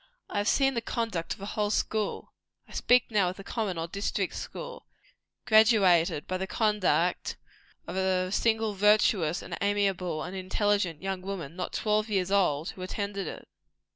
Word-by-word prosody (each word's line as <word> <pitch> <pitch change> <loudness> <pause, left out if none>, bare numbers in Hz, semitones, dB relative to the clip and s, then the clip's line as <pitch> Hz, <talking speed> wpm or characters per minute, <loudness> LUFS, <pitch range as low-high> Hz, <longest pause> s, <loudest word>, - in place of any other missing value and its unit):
I 205 - 0
have 205 - -1
seen 270 -1 +3
the 235 - -1
conduct 225 -8 -2
of - - -18
a - - -5
whole 210 0 -1
school 215 0 -2 0.3
I - - -17
speak 245 -1 +3
now 200 -4 +3
of 185 - -7
the 195 - -9
common 205 -5 -3
or 165 0 -2
district 200 +4 -2
school - - -7 0.6
graduated 195 -9 +4
by 185 - -2
the 190 +1 -3
conduct 205 -5 +1 0.5
of 175 - -6
a 185 -1 +1
single 220 0 +1
virtuous, 200 -4 +3
and - - -5
amiable, 195 -5 0
and 180 +2 -6
intelligent 190 -2 0
young 190 -1 -2
woman, 185 -5 -6
not 180 - -4
twelve 215 0 0
years 190 -2 0
old, 170 -6 +2
who 185 - -12
attended 200 0 -3
it. - - -8
195 Hz, 170 wpm, -28 LUFS, 180-215 Hz, 0.6 s, graduated